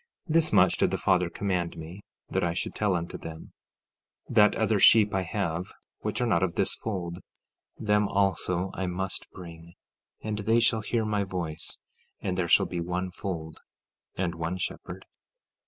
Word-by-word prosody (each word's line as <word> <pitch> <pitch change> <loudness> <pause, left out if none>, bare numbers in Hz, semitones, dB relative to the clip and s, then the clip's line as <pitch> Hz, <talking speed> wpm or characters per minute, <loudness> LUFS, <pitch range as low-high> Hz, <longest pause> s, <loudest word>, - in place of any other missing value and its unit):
15:16 - - 0
This 165 -1 +4
much - - +5
did - - +3
the - - -1
Father 90 -2 +2
command 90 -2 -2
me, 85 +5 -8 0.3
that - - -1
I 85 -1 0
should - - -2
tell 105 -3 +1
unto 85 0 -4
them: 80 -1 -9 0.8
15:17 - - -5
That 105 -1 +6
other 110 -2 +2
sheep 105 0 +7
I 95 - +2
have 90 -2 -3 0.3
which - - -3
are 125 - +2
not 85 -8 +2
of 95 -2 0
this - - +1
fold; 90 -5 -4 0.6
them 105 -1 +2
also 95 -2 0
I 95 - -2
must 95 +1 -3
bring, 85 -1 -11 0.4
and 105 -1 -3
they 110 +3 +3
shall 115 -1 +2
hear 110 +2 0
my 105 -1 +1
voice; 85 -4 -5 0.4
and 90 - -2
there 90 -2 0
shall - - +5
be 90 - -4
one 90 +2 -2
fold, 80 -4 -5 0.6
and 90 -2 -1
one 85 +2 -3
shepherd. 90 - -5
95 Hz, 175 wpm, -28 LUFS, 85-105 Hz, 0.8 s, sheep